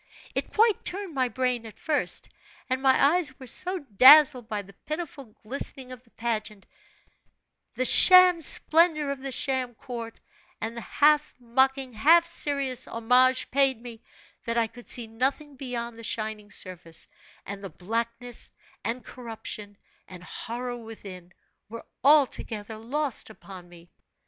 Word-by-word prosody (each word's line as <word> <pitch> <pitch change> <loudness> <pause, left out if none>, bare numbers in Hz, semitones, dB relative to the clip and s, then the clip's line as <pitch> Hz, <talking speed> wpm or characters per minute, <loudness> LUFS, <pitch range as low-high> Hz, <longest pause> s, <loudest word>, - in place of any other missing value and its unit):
"It - - -3
quite 440 -1 +2
turned 385 -2 -5
my 260 -2 0
brain 250 0 -2
at 215 - -14
first; 305 -2 0 0.4
and 260 0 -1
my 275 +2 +4
eyes 290 -7 -2
were 260 - -10
so 365 +9 +1
dazzled 260 - +6
by 210 -1 -3
the 200 +1 -17
pitiful 305 -3 -6 0.2
glistening 255 +2 -7
of 250 -1 -10
the 245 - -28
pageant, 215 -4 -4 1.1
the 255 - -1
sham 365 +3 +8
splendor 315 -1 +3
of 275 -1 -6
the 270 0 -5
sham 255 -2 -1
court, 235 -3 -8 0.4
and 225 +1 -5
the 235 - -6
half 300 +4 +2
mocking, 265 +2 0
half 325 +10 +4
serious 280 -6 +1
homage 250 +3 +2
paid 270 -3 +2
me, 230 -1 -11 0.4
that 230 0 -2
I 230 - +2
could 235 +2 -14
see 240 -2 0
nothing 270 +6 -3
beyond 240 -3 -6
the - - -11
shining 215 -1 -3
surface, 180 -5 -5 0.4
and 200 0 -8
the 195 - -6
blackness, 230 +7 -5 0.3
and 240 +2 -4
corruption, 220 -4 -7 0.3
and 180 -2 -12
horror 245 +6 -6
within, 200 -6 -11 0.4
were 230 +1 -9 0.2
altogether 240 -7 +1
lost 265 +4 -3
upon 190 -4 -13
me. 175 0 -17
245 Hz, 145 wpm, -26 LUFS, 225-275 Hz, 1.1 s, sham